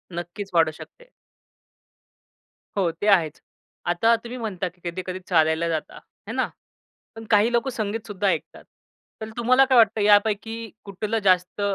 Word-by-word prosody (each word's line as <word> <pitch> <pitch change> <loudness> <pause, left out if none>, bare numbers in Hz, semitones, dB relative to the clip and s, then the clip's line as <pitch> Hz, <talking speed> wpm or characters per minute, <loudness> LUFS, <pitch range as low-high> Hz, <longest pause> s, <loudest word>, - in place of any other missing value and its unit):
नक्कीच 175 +4 -6
वाढू 165 -2 +4
शकते. - - -14 1.7
हो, 185 -4 +1
ते 205 - -4
आहेच. 170 -7 +3 0.5
आता 200 +7 +3
तुम्ही 240 +1 -7
म्हणता 200 -6 -3
की 175 0 -30
कधी-कधी 185 +1 -5
चालायला 160 -1 +2
जाता 160 -2 -3
आहे - - -13
ना, - - +1 0.7
पण 225 0 -9
काही 210 +3 +4
लोकं 240 +3 +1
संगीत 220 -1 -4
सुद्धा 205 -1 -2
ऐकतात. 170 -5 -2 0.6
तर 220 - -5
तुम्हाला 255 +3 +4
काय 260 -1 +3
वाटतं 220 -2 +4
यापैकी 215 +2 +2 0.2
कुठलं 210 +3 -2
जास्त 185 +1 +2
205 Hz, 145 wpm, -24 LUFS, 180-225 Hz, 1.7 s, वाढू